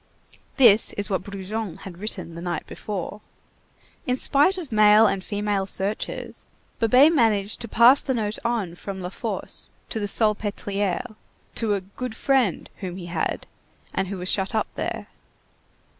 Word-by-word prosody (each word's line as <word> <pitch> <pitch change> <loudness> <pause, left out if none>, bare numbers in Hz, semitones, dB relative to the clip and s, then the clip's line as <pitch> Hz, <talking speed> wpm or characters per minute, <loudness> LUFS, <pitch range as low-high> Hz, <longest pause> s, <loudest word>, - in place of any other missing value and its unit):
This 230 -5 +6
is 205 +1 -2
what 190 - +1
Brujon 200 -1 -5
had 180 -2 -9
written 195 -5 -4
the 170 - -8
night 175 -3 -3
before. 205 0 -6 0.9
In 250 0 +1
spite 295 +9 +3
of 325 -8 -7
male 215 0 +7
and 195 -2 +1
female 205 -1 -1
searchers, 195 +2 -3 0.3
Babet 255 +8 +6
managed 215 -7 +2
to 235 - -4
pass 240 +5 +6
the 265 - -1
note 215 -2 -2
on 230 -7 -1
from 190 +2 -7
La 180 -1 -4
Force - - -4 0.2
to 220 - -2
the 205 - -2
Salpêtrière, 205 0 0 0.4
to 215 -3 +1
a 195 - -2
"good 220 +5 -7
friend" 255 -7 +1
whom 185 -3 -6
he 180 - -7
had - - -1 0.5
and 190 - -1
who 195 +1 -4
was 180 0 -5
shut 195 +3 +1
up 220 - +2
there. - - -4
210 Hz, 160 wpm, -24 LUFS, 190-230 Hz, 0.9 s, male